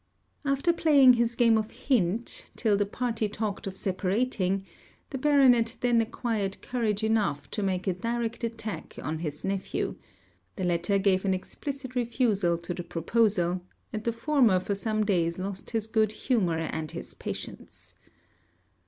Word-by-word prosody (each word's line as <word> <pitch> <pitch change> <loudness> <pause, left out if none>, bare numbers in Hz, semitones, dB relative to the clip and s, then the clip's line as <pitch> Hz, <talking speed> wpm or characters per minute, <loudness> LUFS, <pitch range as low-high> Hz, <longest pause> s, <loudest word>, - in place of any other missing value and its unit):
After 280 +4 +2
playing 290 -6 +6
this 235 -1 +2
game 230 -2 +4
of 215 0 -3
hint, 230 -3 0
till 215 -4 +2
the 205 0 +1
party 225 -1 -1
talked 210 -1 -3
of 190 0 -3
separating, 195 0 0 0.5
the 265 - -3
Baronet 255 -5 +4
then 240 -2 +4
acquired 220 -3 -2
courage 220 -4 -1
enough 210 -10 0
to 215 - -2
make 185 -2 -1
a 190 - +1
direct 230 +4 -3
attack 225 -2 -5
on 155 +1 -3
his 150 -3 -5
nephew; 195 0 -2 0.6
the 190 - -4
latter 175 +3 +1
gave 190 -1 +2
an 190 -1 +2
explicit 265 +7 -6
refusal 225 -8 +1
to 170 +1 -4
the 175 - -5
proposal; 175 +1 +1 0.3
and 215 0 -3
the 235 - +1
former 230 -5 +3
for 195 +2 -2
some 215 +1 0
days 170 -4 +1
lost 190 +1 -5
his 225 -2 -1
good 220 -1 +2
humour 210 -9 0
and 160 -1 -3
his - - -6
patience. - - -8
215 Hz, 155 wpm, -28 LUFS, 185-235 Hz, 0.6 s, playing